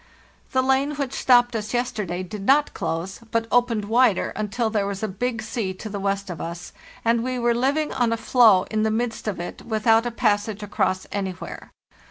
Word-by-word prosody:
"The 260 -2 +2
lane 270 +3 +1
which 275 -2 -3
stopped 245 -2 +4
us 215 +1 -3
yesterday 210 -7 -2
did 195 +3 -7
not 285 +7 +3
close, 165 +4 -3
but 230 0 0
opened 240 -4 +2
wider 230 -2 +3
until 215 +2 -1
there 205 -2 0
was 200 +1 -4
a - - +1
big 220 +3 -3
sea 215 -4 -3
to 215 - -7
the 200 -1 -4
west 195 0 -2
of 170 - -6
us, 170 +1 -7 0.3
and 230 0 +2
we 255 0 -2
were 240 -1 +2
living 275 +6 0
on 240 -2 +1
a 230 - 0
floe 225 -5 +5
in 215 0 +1
the 220 - +2
midst 225 0 -2
of 205 - -2
it 175 - -6
with 220 -2 -4
out 225 +1 +5
a - - 0
passage 210 -2 0
across 190 -2 -1
anywhere. 190 -3 -5
220 Hz, 205 wpm, -23 LUFS, 200-245 Hz, 0.3 s, floe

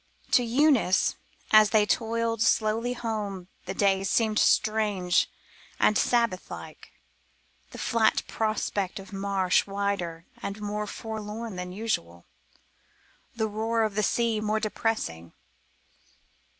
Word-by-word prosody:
To - - +5
Eunice 245 -5 +3 0.4
as 215 -1 +7
they 215 -1 +4
toiled 230 +1 0
slowly 225 +2 +2
home 210 -6 -4 0.2
the - - -4
day 195 -1 +2
seemed 215 +2 +1
strange 210 -5 +2 0.5
and 215 - +4
Sabbath 235 -7 +1
like, - - -10 0.8
the - - -11
flat 230 -2 +2
prospect 210 -3 -2
of 195 +1 -10
marsh 195 -2 +1
wilder 195 -4 -2 0.2
and 200 +2 -5
more 210 0 -3
forlorn 220 0 -6
than 180 0 -5
usual, 85 - -3 1.1
the 220 -1 0
roar 225 +2 0
of 215 -2 -1
the 210 - 0
sea 225 0 +1
more 215 0 0
depressing. 215 - -2
215 Hz, 115 wpm, -27 LUFS, 195-225 Hz, 1.1 s, as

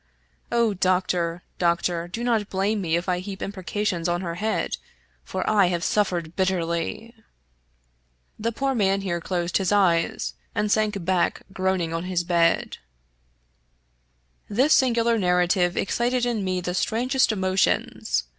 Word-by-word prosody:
O 235 -3 +2
Doctor, 180 -2 0 0.2
Doctor! 170 0 +1
do 225 +7 -5
not 225 -4 +1
blame 200 +2 0
me 165 -3 0
if 175 +2 -2
I 180 -1 +1
heap 190 +1 -7
imprecations 190 -3 -2
on 175 +1 0
her 170 -2 -3
head, 215 +6 -1 0.5
for 185 - -4
I 205 -3 +4
have 175 -1 -1
suffered 175 -6 0
bitterly! 185 +4 -1 0.6
" - - -43
The 230 - +1
poor 270 +4 -1
man 195 -4 +1
here 175 -3 -2
closed 175 0 -1
his 190 -1 0
eyes 175 -5 +2 0.2
and 210 0 0
sank 210 -4 +1
back 185 -1 +1
groaning 185 -3 0
on 165 +1 -3
his 180 -1 -1
bed. 170 -1 +1 1.7
This 260 +9 +3
singular 235 -3 +3
narrative 180 -1 +2
excited 245 +4 0
in 235 -4 -1
me 185 -1 -1
the 180 0 -3
strangest 245 +6 +1
emo 190 -3 -1
tions. 190 - +1
185 Hz, 145 wpm, -24 LUFS, 175-210 Hz, 1.7 s, I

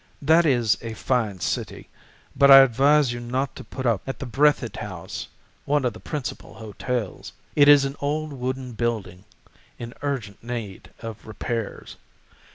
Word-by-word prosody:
That 160 +3 +5
is 120 -7 +2
a 115 -1 -6
fine 110 -7 -1
city, - - -3 0.5
but 140 0 +5
I 135 0 +11
advise 135 +1 +4
you 120 - -5
not 125 +2 -3
to - - -9
put 130 - -7
up 115 -5 +2
at 135 - -4
the - - -6
Breathitt 130 -2 +1
House, 95 -5 -6 0.4
one 145 -2 +1
of 120 - 0
the 110 - -11
principal 145 0 -6
hotels. 110 0 -5 0.2
It 145 -1 +6
is 145 -1 +7
an 135 +1 -4
old 150 +1 -2
wooden 130 0 -4
building 110 -5 -3 0.5
in 120 0 -8
urgent 125 -9 -4
need 115 -5 -6
of 115 -2 -8
repairs. 110 +1 -5
125 Hz, 160 wpm, -24 LUFS, 110-140 Hz, 0.5 s, I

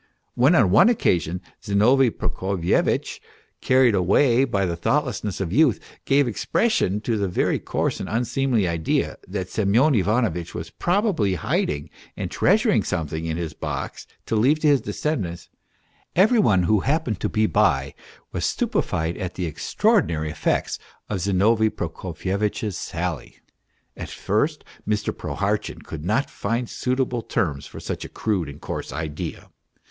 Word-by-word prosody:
When 135 +8 +4
on 110 - +4
one 165 - +7
occasion 90 - +1 0.2
Zinovy 120 +6 +4
Prokofyevitch, 95 -4 -1 0.4
carried 130 -3 +4
away 115 +8 +3
by 100 -7 0
the 85 -2 -2
thoughtlessness 120 - -1
of 95 -2 -2
youth, 145 -3 +4 0.3
gave 140 -1 +3
expression 115 - 0
to 115 -1 -1
the 100 - 0
very 90 - 0
coarse - - -2
and - - -5
unseemly 120 -2 +1
idea, 85 -2 -1
that 90 -1 -4
Semyon 115 +9 +3
Ivanovitch 100 -5 0
was 80 +1 -6
probably 175 - +1
hiding 75 -2 -1 0.3
and - - -4
treasuring - - +3
something 80 0 -3
in 80 0 -2
his 85 -3 -4
box - - -5 0.2
to - - -1
leave 130 +8 +4
to 155 - +3
his 140 -2 +4
descendants, 95 - -3 0.7
every 215 +6 +5
one 100 - +4
who 105 +4 +3
happened 135 - 0
to - - -1
be 110 0 +2
by 90 -12 +2 0.4
was - - -3
stupefied 80 +2 -1
at 95 -3 -5
the 90 - -2
extra 80 - -2
ordinary 80 -2 +1
effects 75 - -1 0.3
of 105 - -2
Zinovy 105 +4 +3
Prokofyevitch's 95 +4 -3
sally. 85 -5 -4 0.6
At - - -7
first 145 +10 -1 0.2
Mr. 105 -1 -1
Prohartchin - - -2
could 75 -2 -7
not 110 - +1
find 115 +4 -2
suitable 125 -1 -1
terms 75 -9 -2
for - - -10
such - - -5
a - - -8
crude 95 -9 -1
and 70 +1 -10
coarse - - -5
idea. 75 +1 -5
105 Hz, 145 wpm, -23 LUFS, 85-125 Hz, 0.7 s, one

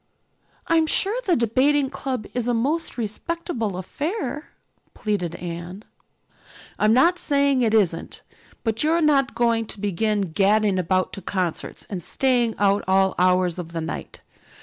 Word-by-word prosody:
"I'm 325 -1 +3
sure 395 +6 +2
the 355 - +4
Debating 265 +4 +2
Club 255 -5 -4
is 245 -1 -2
a 245 - +1
most 295 +8 -1
respectable 230 - -3
affair," 295 - -4 0.5
pleaded 180 -6 -2
Anne. 175 +3 -7 1.0
"I'm 215 +1 +4
not 335 +10 +4
saying 280 -2 +2
it 225 -2 +2
isn't. 175 -6 0 0.4
But 225 +1 0
you're 320 +2 +3
not 275 -3 +2
going 230 -2 +1
to 215 - -7
begin 205 +1 0
gadding 200 +2 +2
about 185 +1 0
to 195 - -7
concerts 180 -3 -3
and 190 -4 -5
staying 240 +3 +1
out 200 0 +2
all 190 0 +3
hours 180 -1 +2
of 170 -1 -7
the 165 - -3
night. 160 - -6
220 Hz, 145 wpm, -23 LUFS, 190-275 Hz, 1.0 s, the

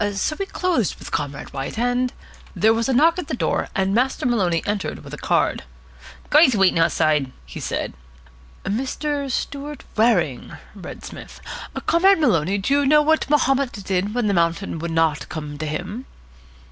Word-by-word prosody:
So 200 +10 -1
we 390 - -2
closed 350 - 0
with - - -10
Comrade 145 -1 -4
White, 135 +8 -5
and 245 +1 +1 0.2
" - - -23
There 220 +1 +4
was 230 +3 0
a - - +2
knock 330 +7 +4
at 355 - -5
the - - -2
door, - - 0
and 195 -1 +1
Master 255 +5 +1
Maloney 185 -9 +1
entered 205 -1 -3
with - - -11
a - - -5
card. - - +1 0.7
"Guy's 295 -5 +6
waiting 195 -4 +3
outside," 155 -4 +2
he 60 - -9
said. - - -3 0.7
"Mr. 275 +6 -2
Stewart 285 +2 -4
Waring," 190 - +1 0.2
read 200 -3 -9
Psmith. - - -10 0.5
"Comrade 380 +4 +5
Maloney, 195 - +2
do 200 +8 0
you 285 0 +3
know 300 +1 +6
what 315 0 +2
Mahomet 270 -2 +2
did 200 +1 -2
when 245 -2 +1
the 205 - +2
mountain 170 0 0
would 170 +2 -4
not 165 -2 +1
come 150 -2 -6
to 155 - -3
him?" 185 - -5
220 Hz, 170 wpm, -22 LUFS, 170-275 Hz, 0.7 s, Guy's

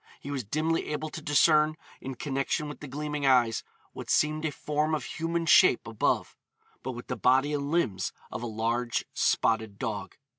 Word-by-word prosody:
He 140 - -7
was 135 -3 -2
dimly 155 +9 -1
able 150 +1 -3
to 160 - -7
discern, 150 +1 +4 0.2
in 130 0 -6
connection 135 +3 -2
with 150 - -8
the 150 - -8
gleaming 150 +1 -4
eyes, 120 -4 +3 0.3
what - - -8
seemed 155 +1 +2
a 155 - 0
form 150 +2 -1
of 150 - -4
human 165 +3 -2
shape 170 -5 +6
above, 115 -2 0 0.5
but 130 - -4
with 120 0 -8
the 125 - -3
body 130 +6 +3
and 140 -1 -2
limbs 115 - 0 0.2
of 110 - -5
a 120 - -3
large 115 +2 -1
spotted 110 -3 +1
dog. - - -4
145 Hz, 180 wpm, -28 LUFS, 120-155 Hz, 0.5 s, shape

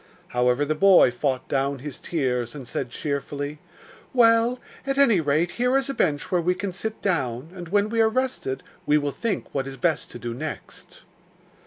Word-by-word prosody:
However, 125 +3 +2
the 155 - 0
boy 185 -4 +6
fought 130 +1 -1
down 140 +1 0
his 140 0 -7
tears, 125 -6 -1
and 135 -4 -8
said 125 - -3
cheerfully: 145 +2 -4 0.6
'Well, 230 0 +5 0.3
at 275 0 -2
any 235 -10 +5
rate 155 +4 +1
here 250 +5 +2
is 275 0 -1
a - - -5
bench 150 - 0
where 180 -2 +3
we 180 +2 +1
can 200 0 -3
sit 215 +4 -4
down, 145 - -1
and 175 -2 -8
when 205 +2 +2
we 225 +1 +1
are 220 - +5
rested 235 - -2 0.2
we 150 - +5
will 145 -1 -1
think 230 - -3
what 135 -1 -1
is 135 0 -7
best 165 -2 0
to - - -8
do 120 -1 -5
next. 150 +5 -8
155 Hz, 190 wpm, -24 LUFS, 135-210 Hz, 0.6 s, boy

